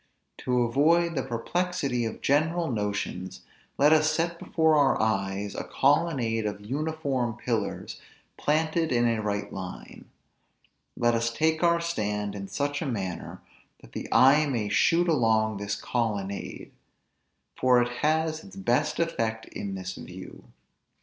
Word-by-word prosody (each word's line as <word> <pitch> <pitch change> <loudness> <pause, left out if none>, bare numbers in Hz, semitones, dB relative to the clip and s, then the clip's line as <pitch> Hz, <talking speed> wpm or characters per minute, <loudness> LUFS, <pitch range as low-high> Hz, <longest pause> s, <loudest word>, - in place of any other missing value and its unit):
To 125 -1 +1
avoid 165 +8 +3
the 135 - -1
perplexity 135 +1 -1
of 110 - -5
general 160 +3 +1
notions; 100 -4 -3 0.4
let 145 +3 +5
us 155 0 +4
set 170 +2 -1
before 160 -1 +2
our 140 -2 +3
eyes, 100 -2 -1
a - - -4
colonnade 135 -7 +1
of 105 0 -6
uniform 140 -3 -2
pillars 115 -4 -3 0.3
planted 160 +2 0
in 120 -1 +3
a 115 -2 0
right 100 -1 -3
line; 95 -2 -8 0.9
let 120 0 +3
us 115 0 +1
take 160 +5 +1
our 170 -1 +4
stand 105 -11 -2
in 100 -1 -6
such 140 +8 -2
a 160 - -2
manner, 95 -8 -4 0.4
that - - -16
the - - -6
eye 145 +4 +6
may 115 -7 -1
shoot 170 - +3
along 110 -8 +2
this 100 0 -3
colonnade, 105 -5 -3 0.8
for 125 -1 +4
it 120 0 -1
has 160 +1 +1
its 200 - -13
best 150 -6 0
effect 115 -9 -1
in 100 -1 -5
this 95 0 -5
view. - - -10
125 Hz, 140 wpm, -27 LUFS, 105-155 Hz, 0.9 s, eye